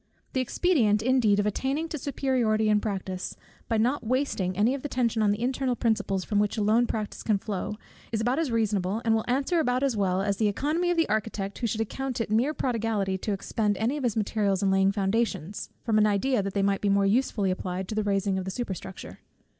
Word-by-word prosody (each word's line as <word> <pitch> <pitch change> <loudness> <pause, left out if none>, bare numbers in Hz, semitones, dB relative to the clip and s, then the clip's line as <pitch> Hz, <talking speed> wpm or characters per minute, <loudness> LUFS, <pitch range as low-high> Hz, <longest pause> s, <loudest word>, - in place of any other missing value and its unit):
The 260 - +1
expedient 240 - +2
indeed 240 -5 +3
of 205 - +1
attaining 270 +9 -1
to 310 - -3
superiority 245 -6 +1
in 210 0 +4
practice, 190 -3 -4 0.3
by 225 - +2
not 245 +6 +1
wasting 220 -7 -1
any 220 +5 +3
of 275 - -4
the 290 - -3
attention 240 -4 0
on 210 - +3
the 205 +1 0
internal 255 +1 0
principles 215 -5 0
from 205 +2 0
which 210 +2 0
alone 220 +3 +3
practice 215 -2 -4
can 215 -3 +1
flow, 210 +1 -4 0.3
is 225 - 0
about 245 +6 +1
as 325 -4 0
reasonable, 215 -2 0
and 225 - +3
will 220 0 +1
answer 275 +7 +1
about 255 -3 +1
as 270 -4 +1
well, 190 -2 +1
as 200 -1 0
the 210 -1 +2
oeconomy 310 - 0
of 350 - +1
the 330 - +3
architect, 210 -2 -2
who 235 - 0
should 225 0 -1
account 260 +3 -3
it 225 -2 -2
mere 250 +8 +2
prodigality 225 -6 -1
to 210 - -3
expend 205 +1 -1
any 235 +6 0
of 295 - -4
his 230 -3 0
materials 205 -2 0
in 195 - +3
laying 195 0 +4
foundations, 200 -2 -1
from 220 -3 +2
an 215 - +5
idea 210 +4 +1
that 195 0 -4
they 200 - +2
might 195 0 +1
be 205 - +1
more 200 0 +3
usefully 205 -2 +1
applied 185 0 -3
to - - -4
the 215 - 0
raising 195 -1 0
of 185 - -5
the - - -3
superstructure. 190 -3 -6
215 Hz, 225 wpm, -27 LUFS, 200-250 Hz, 0.3 s, an